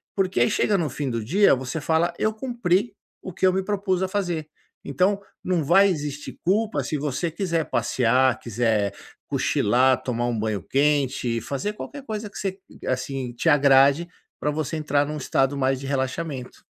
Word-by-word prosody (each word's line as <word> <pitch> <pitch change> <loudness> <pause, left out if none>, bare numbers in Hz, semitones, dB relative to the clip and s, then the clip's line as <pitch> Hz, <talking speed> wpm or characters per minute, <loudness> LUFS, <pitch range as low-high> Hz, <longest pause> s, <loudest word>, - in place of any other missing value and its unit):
porque 190 -7 0
aí 120 - +4
chega 205 - +2
no 165 -5 -1
fim 135 +2 -3
do 115 -2 -2
dia, 195 - +4
você 130 +4 -4
fala: 165 +3 +1
"Eu 215 - +1
cumpri 220 -3 0 0.3
o 185 - -7
que 190 - 0
eu - - +5
me 190 +1 0
propus 190 -2 -1
a - - +1
fazer". 175 -6 -2 0.4
Então 185 +9 +1 0.2
não 180 -3 0
vai 195 +7 +5
existir 150 -4 -4
culpa 200 -5 +1
se 150 +5 -2
você 150 +4 -2
quiser 170 -2 -1
passear, 130 +1 +2
quiser 110 -3 0 0.3
cochilar, 130 +4 +2
tomar 120 -2 -1
um 120 -2 -1
banho 105 -4 -2
quente, 135 - +1
fazer 140 - -3
qualquer 280 +6 -8
coisa 215 -2 -4
que - - -11
se 195 -1 -3 0.3
assim, 130 -1 -2
te 120 - 0
agrade, 140 +3 +5 0.3
pra 150 - 0
você 155 +1 -3
entrar 145 -2 +1
num 150 +1 -4
estado 135 0 0
mais 135 -1 +1
de 135 - -7
relaxamento. 135 0 -3
150 Hz, 175 wpm, -24 LUFS, 130-185 Hz, 0.4 s, eu